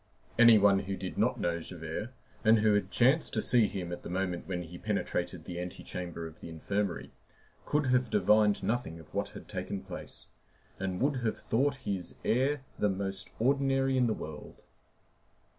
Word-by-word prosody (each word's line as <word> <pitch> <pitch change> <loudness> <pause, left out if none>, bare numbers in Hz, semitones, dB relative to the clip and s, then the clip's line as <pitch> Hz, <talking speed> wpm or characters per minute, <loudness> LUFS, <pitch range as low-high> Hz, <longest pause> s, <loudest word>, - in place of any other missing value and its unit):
Any 115 -2 +9
one 100 -1 +5
who 95 0 -4
did 95 0 -5
not - - +2
know 85 0 0
Javert, 80 +5 -5 0.3
and 110 +1 +6
who 105 0 +4
had 105 - +1
chanced 135 +6 +3
to - - +2
see 120 -4 +4
him 90 -4 -5
at 85 - -5
the - - -8
moment 90 -1 -2
when 90 -2 -2
he 85 +1 -10
penetrated 90 -5 -2
the 85 0 -5
antechamber 90 -1 -5
of 80 -1 -10
the - - -8
infirmary, 95 +3 -2 0.6
could 150 0 +2
have 125 -2 +2
divined 105 0 +4
nothing 100 -6 -1
of 80 - -15
what - - -1
had - - -11
taken 100 - -4
place, 95 -2 -8 0.5
and 95 -1 -2
would 140 +1 +2
have 115 -3 -1
thought 140 +5 +1
his 95 -3 -3
air 135 +4 +2 0.2
the 105 - +3
most 95 0 -3
ordinary 135 +1 +2
in 125 -2 +3
the 110 - 0
world. 75 -1 -8
100 Hz, 175 wpm, -31 LUFS, 90-120 Hz, 0.6 s, Any